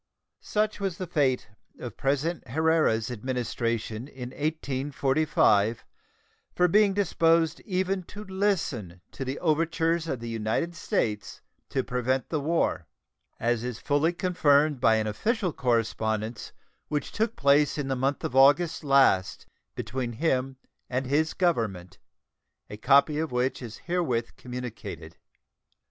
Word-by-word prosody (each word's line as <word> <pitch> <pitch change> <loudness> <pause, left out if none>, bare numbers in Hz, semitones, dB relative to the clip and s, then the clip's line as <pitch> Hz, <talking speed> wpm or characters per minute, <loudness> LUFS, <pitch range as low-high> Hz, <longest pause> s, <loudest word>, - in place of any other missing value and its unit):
Such 215 0 -1
was 195 -3 -2
the 185 - -4
fate 135 -8 +1 0.3
of 120 -3 -7
President 145 +4 -1
Herrera's 145 -5 +2
administration 115 -1 -3
in 125 -3 -8
1845 135 -7 +1 0.7
for 180 - +4
being 200 +2 +4
disposed 165 -5 +2
even 190 -1 -1
to 205 +4 -9
listen 180 - -2
to 135 - -5
the 130 +1 -4
overtures 165 0 +1
of 135 -6 -2
the 120 - -7
United 115 +9 -1
States 105 -8 -2 0.3
to 130 - -1
prevent 125 +1 -1
the 155 - -1
war, 165 +4 0 0.5
as 120 0 0
is 125 -2 -4
fully 145 +5 +1
confirmed 155 -5 +2
by 115 -3 +5
an 110 -1 0
official 185 - -1
correspondence 110 -3 -1 0.4
which 150 -1 -3
took 225 +1 -1
place 140 +2 +3
in 145 -2 -2
the 135 - 0
month 135 +2 -1
of 125 - -3
August 145 +6 +4
last 135 -10 +3 0.3
between 125 -2 -4
him 130 -1 0 0.3
and 130 +1 -1
his 150 +4 +1
Government, 110 - -1 0.7
a 105 - -6
copy 140 +5 +4
of 160 -2 -2
which 125 +2 -1
is 115 -3 -8
herewith 160 -10 -2
communicated. 115 - -7
135 Hz, 130 wpm, -27 LUFS, 120-165 Hz, 0.7 s, by